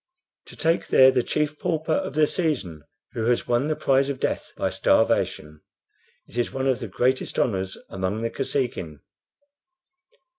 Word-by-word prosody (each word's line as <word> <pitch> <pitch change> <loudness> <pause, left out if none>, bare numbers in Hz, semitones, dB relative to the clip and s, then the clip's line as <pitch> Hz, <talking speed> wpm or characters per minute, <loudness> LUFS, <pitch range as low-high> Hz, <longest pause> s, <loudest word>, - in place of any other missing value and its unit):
"To - - -12
take 165 +1 +1
there 130 0 +7
the 130 -1 +2
chief 150 +3 -2
pauper 160 -1 -1
of 140 - -2
the 155 0 +5
season, 145 - -2 0.3
who 110 - -3
has 120 0 +1
won 120 +4 +1
the 155 - 0
prize 135 0 +2
of 135 -2 -3
death - - -2
by - - -1
starvation. 75 0 +1 0.7
It 120 - -5
is 120 - 0
one 135 0 -3
of 130 -3 +1
the 115 - -5
greatest 125 +7 0
honors 95 -4 0
among 95 +4 -3
the 115 - -1
Kosekin." 120 - -3
130 Hz, 160 wpm, -24 LUFS, 105-145 Hz, 0.7 s, there